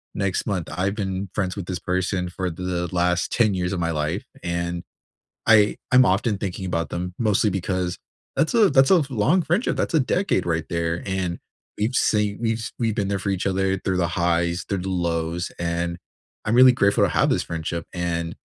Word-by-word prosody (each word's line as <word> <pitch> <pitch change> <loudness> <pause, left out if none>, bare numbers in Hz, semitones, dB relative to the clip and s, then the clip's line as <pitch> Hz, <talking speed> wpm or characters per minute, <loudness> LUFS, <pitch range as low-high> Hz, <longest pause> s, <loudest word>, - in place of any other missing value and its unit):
next 100 -2 -1
month. 95 -5 -2
I've 95 +6 -1
been 95 -2 -3
friends 95 -2 -1
with 100 - -5
this 90 -1 -4
person 90 0 -1
for 90 +1 -3
th 80 - -9
the 90 -1 -2
last 90 0 +1
10 110 -4 +3
years 90 +1 -1
of 90 - -2
my 85 -1 0
life, 80 +4 -2 0.2
and 85 0 -2 0.6
I 110 -2 +5
I'm 125 0 +7
often 100 +2 +1
thinking 95 -1 -4
about 85 -2 -2
them 90 +1 -4
mostly 105 -2 +2
because 90 -1 -2 0.4
that's 160 - +1
a 220 -4 +5
that's 135 +1 +4
a 180 -4 +6
long 135 - +3
friendship, 175 +8 0
that's - - -1
a 160 - +5
decade 130 - 0
right 80 -2 -1
there, 85 0 -1
and 95 -3 -2 0.4
we've 110 +5 -1
seen 105 -3 +2
we've 115 -1 0
s 115 - -5
we've 115 -3 0
been 100 -3 0
there 100 -1 -1
for 100 - -3
each 95 0 -1
other 95 0 +1
through 95 - -1
the 90 -1 +1
highs, 85 0 0
through 100 - -1
the 95 +2 -4
lows, 85 -1 -1
and 85 0 -2 0.5
I'm 105 - +1
really 130 0 +8
grateful 100 -4 +3
to - - 0
have - - +2
this - - +1
friendship, 85 0 -4
and 85 -2 -2
95 Hz, 205 wpm, -23 LUFS, 85-105 Hz, 0.6 s, really